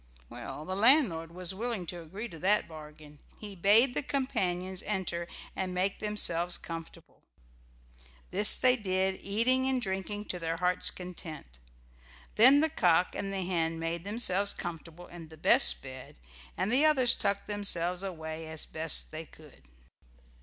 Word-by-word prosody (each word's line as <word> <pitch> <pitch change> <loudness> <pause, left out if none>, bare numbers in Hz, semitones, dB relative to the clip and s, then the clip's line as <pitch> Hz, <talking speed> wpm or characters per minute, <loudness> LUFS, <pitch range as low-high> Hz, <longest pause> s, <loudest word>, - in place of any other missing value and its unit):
Well, 155 - -8
the 185 - -4
landlord 205 - +3
was 180 +1 -4
willing 220 -2 -4
to 175 +1 -6
agree 195 +8 -7
to 165 - -11
that 200 +5 +2
bargain. 150 -2 -13 0.2
He 205 -2 -8
bade 215 +8 +4
the - - -1
companions 190 -10 -2
enter 180 -4 -3 0.3
and 185 -1 -4
make 190 +2 -1
themselves 175 -5 0
comfortable. 165 -1 -10 1.1
This 205 +2 +4
they 255 0 +4
did, 190 -4 -1
eating 255 +6 +3
and 260 -1 +1
drinking 205 0 -4
to 180 - -6
their 165 0 -2
hearts' 180 +1 +1
content. 165 - -9 0.7
Then 265 +6 +7
the 320 - +1
cock 180 - +2
and 195 - -4
the 195 -1 -3
hen 165 -2 -1
made 165 +1 -4
themselves 200 -2 +2
comfortable 170 0 -8
in 170 -2 -11
the 160 0 -15
best - - +5
bed, 130 -1 -10 0.4
and 215 - -1
the 265 +5 +3
others 265 -6 +6
tucked 200 0 -1
themselves 180 -4 -2
away 160 -4 -6
as 160 -1 -2
best 160 0 0
they 155 0 -7
could. 155 -3 -17
185 Hz, 155 wpm, -29 LUFS, 165-210 Hz, 1.1 s, Then